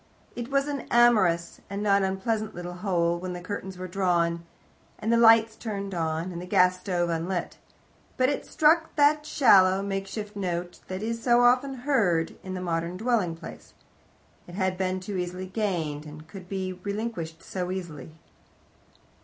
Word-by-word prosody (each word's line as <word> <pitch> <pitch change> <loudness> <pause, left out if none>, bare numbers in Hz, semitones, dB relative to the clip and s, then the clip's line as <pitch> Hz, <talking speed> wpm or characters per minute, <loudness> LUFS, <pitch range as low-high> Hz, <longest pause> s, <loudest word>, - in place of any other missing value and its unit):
It 240 0 -5
was 275 0 +1
an 285 -2 -4
amorous 210 -8 +3
and 200 +1 -4
not 200 -1 +4
unpleasant 210 +3 -1
little 175 0 -6
hole 175 -2 0
when 180 0 -5
the 180 - -5
curtains 190 0 -6
were 185 0 -5
drawn, 170 -2 0 0.5
and 225 +2 0
the - - +4
lights 225 -1 +6
turned 200 -4 -5
on, 165 +1 -2
and 170 -1 -6
the 180 - -8
gas 180 0 +3
stove 175 -2 -1
unlit. 170 +2 -3 0.6
But 255 - +3
it 285 - -2
struck 320 +1 +2
that 300 +1 +3
shallow 195 -9 +5
makeshift 200 +2 -4
note 175 -3 -3
that 185 +2 -5
is 230 +1 -3
so 240 0 +4
often 255 +3 +3
heard 180 - +2
in 185 0 -6
the 185 - -4
modem 170 0 -2
dwelling 215 -6 0
place. 165 - -11 0.7
It 175 - -10
had 190 -1 0
been 185 0 -1
too 195 +1 -4
easily 180 +1 -4
gained, 175 -7 -2
and 155 +1 -11
could 180 +1 -11
be 190 -1 -3
relinquished 185 -4 -5
too 180 -1 -3
easily. 175 -5 -6
190 Hz, 165 wpm, -27 LUFS, 175-220 Hz, 0.7 s, lights